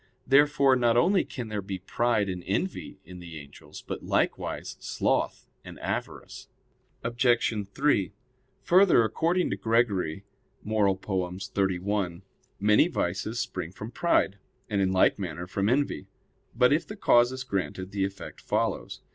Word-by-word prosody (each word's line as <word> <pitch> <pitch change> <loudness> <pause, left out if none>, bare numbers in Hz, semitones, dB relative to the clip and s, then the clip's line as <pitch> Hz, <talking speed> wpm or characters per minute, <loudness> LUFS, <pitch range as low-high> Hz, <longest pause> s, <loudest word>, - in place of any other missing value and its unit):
Therefore 140 -1 +5
not 120 -2 +2
only 185 +8 +4
can 120 -4 -7
there 105 -1 -3
be 95 0 -5
pride 110 +3 0
and 90 -2 -4
envy 145 - -2
in 90 +1 -10
the 85 -2 -9
angels; 70 0 -12
but - - -6
likewise - - -1
sloth - - -1 0.2
and - - -11
avarice. - - -5 0.6
Obj. 120 -3 +1
3: 120 -8 +1 0.5
Further, 180 -9 +5
according 165 - 0
to 95 - -2
Gregory 100 -5 0 0.4
(Moral. 105 -3 +1
xxxi), 95 0 -2 0.4
many 105 - +4
vices 100 - -2
spring 90 -7 -4
from 105 +4 -8
pride; 110 - +1 0.3
and 100 -4 0
in 95 -1 +2
like 95 +1 +3
manner 85 -2 -4
from 100 +3 -1
envy. 140 +4 0 0.5
But, 125 +2 +4
if 155 +2 0
the 210 - -7
cause 120 -9 +4
is 130 0 -5
granted, 100 -4 -3
the 100 -1 -1
effect 100 0 -6
follows. - - -2
105 Hz, 140 wpm, -27 LUFS, 95-125 Hz, 0.6 s, Therefore